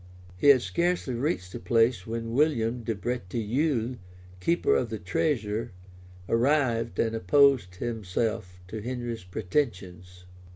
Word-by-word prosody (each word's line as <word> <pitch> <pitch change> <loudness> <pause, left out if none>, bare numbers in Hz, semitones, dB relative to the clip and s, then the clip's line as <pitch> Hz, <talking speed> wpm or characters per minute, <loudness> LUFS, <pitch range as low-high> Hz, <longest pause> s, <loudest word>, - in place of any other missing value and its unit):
He 90 - 0
had 135 -4 +7
scarcely 170 -6 0
reached 120 - -2
the - - -5
place 115 +1 +2
when 115 0 -4
William 125 -4 +1
de 115 -1 -2
Breteuil, 120 - -1 0.4
keeper 170 - +2
of 120 - 0
the 110 - -3
treasure, 105 - -1 0.5
arrived, 120 -1 +1
and 115 0 +1
opposed 115 -2 +3
himself 110 -2 -3
to 110 +2 -5
Henry's 120 -2 -4
pretensions. 90 - -3
115 Hz, 120 wpm, -27 LUFS, 100-130 Hz, 0.5 s, had